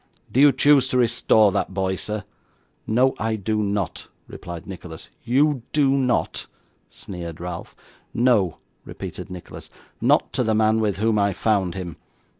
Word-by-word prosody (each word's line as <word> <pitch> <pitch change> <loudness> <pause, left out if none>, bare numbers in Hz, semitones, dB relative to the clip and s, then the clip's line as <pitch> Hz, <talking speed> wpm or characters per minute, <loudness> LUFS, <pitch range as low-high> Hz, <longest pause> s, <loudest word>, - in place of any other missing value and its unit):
Do 130 - +1
you 145 0 +8
choose 140 -2 +4
to 130 - 0
restore 110 -3 +4
that 95 - -2
boy, 95 -1 0
sir?' 105 +2 -4 0.6
'No, 125 +4 +3
I 110 0 0
do 105 +1 -1
not,' 100 -3 -2 0.2
replied 85 -2 -8
Nicholas. 90 -4 -10
'You 140 +2 +2
do 145 -3 +3
not?' 130 -3 0 0.4
sneered 85 -3 -8
Ralph. 85 0 -7 0.4
'No,' 115 -8 +2 0.3
repeated - - -8
Nicholas, 90 -2 -10 0.3
'not - - +2
to - - +1
the 110 -1 +1
man 110 0 +3
with 105 -3 0
whom 110 +1 +1
I 100 -1 +2
found 95 -3 0
him. 90 -4 -6
105 Hz, 150 wpm, -23 LUFS, 95-120 Hz, 0.6 s, you